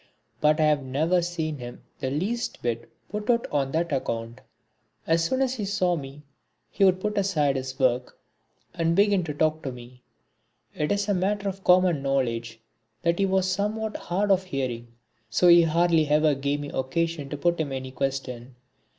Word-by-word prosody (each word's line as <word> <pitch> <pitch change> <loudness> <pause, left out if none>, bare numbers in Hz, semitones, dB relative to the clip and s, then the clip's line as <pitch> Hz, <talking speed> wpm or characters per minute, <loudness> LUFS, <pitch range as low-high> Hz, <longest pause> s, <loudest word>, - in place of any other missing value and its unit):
But 150 +1 +3
I - - +4
have 150 -2 +3
never 155 +7 +1
seen 160 -4 -3
him 120 0 -9 0.2
the 130 - -2
least 210 - -3
bit 115 -1 -2 0.2
put 210 +1 -5
out 235 -1 +3
on 140 -2 0
that 170 +1 0
account. 115 -3 -3 0.6
As 165 0 +2
soon 260 +11 +1
as 260 -1 0
he 220 -6 -3
saw 185 -3 +1
me 140 -1 -8 0.5
he 200 - 0
would 185 -1 +5
put 210 +1 -1
aside 155 -8 +1
his 130 0 -4
work 125 -1 0 0.6
and 165 -1 +1
begin 200 -1 +3
to 150 - -4
talk 155 +1 +1
to 135 - -4
me. 125 0 -12 0.7
It 150 - -1
is 205 0 0
a 205 - +2
matter 200 +2 0
of 195 0 -5
common 180 -4 +4
knowledge 115 -4 -1 0.4
that 170 +1 +1
he 195 - +3
was 190 0 +1
somewhat 210 +3 -2
hard 195 +4 -1
of 190 -1 +3
hearing, 130 -7 -3 0.4
so 175 +10 +3
he 170 0 +9
hardly 165 -1 +3
ever 150 +1 +3
gave 140 +1 -1
me 145 - -6
occasion 145 +2 -2
to 145 - -4
put 170 +3 +1
him 145 -3 -3
any 130 -1 -5
question. 130 -2 -4
155 Hz, 185 wpm, -26 LUFS, 135-185 Hz, 0.7 s, he